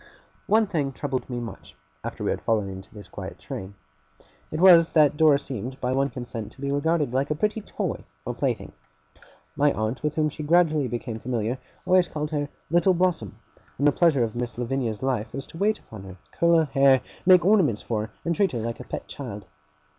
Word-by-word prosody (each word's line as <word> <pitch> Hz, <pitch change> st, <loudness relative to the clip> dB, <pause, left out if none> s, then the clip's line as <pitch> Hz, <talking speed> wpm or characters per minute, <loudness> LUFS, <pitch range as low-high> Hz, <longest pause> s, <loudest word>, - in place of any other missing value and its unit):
One 220 Hz, +1 st, +4 dB
thing 150 Hz, -8 st, -1 dB
troubled 135 Hz, -1 st, -3 dB
me 125 Hz, -1 st, -3 dB
much, 120 Hz, -1 st, -9 dB, 0.3 s
after -, -, -5 dB
we -, -, +1 dB
had -, -, -3 dB
fallen 110 Hz, -3 st, +1 dB
into 95 Hz, 0 st, -9 dB
this 105 Hz, -3 st, -11 dB
quiet -, -, -8 dB
train. 95 Hz, +1 st, -7 dB, 0.7 s
It 155 Hz, -, -4 dB
was, 170 Hz, -2 st, +8 dB
that 150 Hz, -2 st, +5 dB
Dora 150 Hz, -2 st, +5 dB
seemed 130 Hz, -1 st, -6 dB
by 125 Hz, -, -1 dB
one 135 Hz, +1 st, +1 dB
consent 120 Hz, -3 st, -6 dB
to -, -, -22 dB
be 140 Hz, 0 st, -1 dB
regarded 145 Hz, -1 st, +1 dB
like 135 Hz, +2 st, 0 dB
a 150 Hz, -, 0 dB
pretty 210 Hz, +7 st, -1 dB
toy -, -, -4 dB, 0.2 s
or -, -, -2 dB
plaything. -, -, -2 dB, 0.8 s
My 145 Hz, 0 st, +3 dB
aunt, 110 Hz, +4 st, -2 dB
with 150 Hz, 0 st, -1 dB
whom 155 Hz, -1 st, +2 dB
she 150 Hz, -, -8 dB
gradually 155 Hz, -2 st, +3 dB
became 120 Hz, -1 st, -4 dB
familiar, 120 Hz, +1 st, -2 dB, 0.3 s
always 185 Hz, -1 st, +4 dB
called 150 Hz, -1 st, -4 dB
her 145 Hz, -1 st, -1 dB, 0.2 s
Little 175 Hz, +2 st, +4 dB
Blossom; 170 Hz, -, 0 dB, 0.4 s
and 145 Hz, -, +3 dB
the -, -, +6 dB
pleasure 155 Hz, -6 st, +3 dB
of 115 Hz, -1 st, -3 dB
Miss 120 Hz, -1 st, -4 dB
Lavinia's 120 Hz, -2 st, -2 dB
life 125 Hz, -5 st, -1 dB
was 135 Hz, -, -4 dB
to -, -, -12 dB
wait 215 Hz, +2 st, +2 dB
upon 110 Hz, -3 st, -12 dB
her, 95 Hz, -1 st, -10 dB
curl 170 Hz, 0 st, +3 dB
her 160 Hz, -, +3 dB
hair, 135 Hz, -2 st, +4 dB, 0.3 s
make 180 Hz, -2 st, +7 dB
ornaments 180 Hz, -, +3 dB
for 110 Hz, -2 st, -2 dB
her, -, -, -26 dB
and 170 Hz, 0 st, +1 dB
treat 195 Hz, -4 st, +2 dB
her 120 Hz, -, -2 dB
like 115 Hz, +1 st, -4 dB
a -, -, -6 dB
pet -, -, -6 dB
child. 105 Hz, -8 st, -7 dB
140 Hz, 205 wpm, -25 LUFS, 120-160 Hz, 0.8 s, was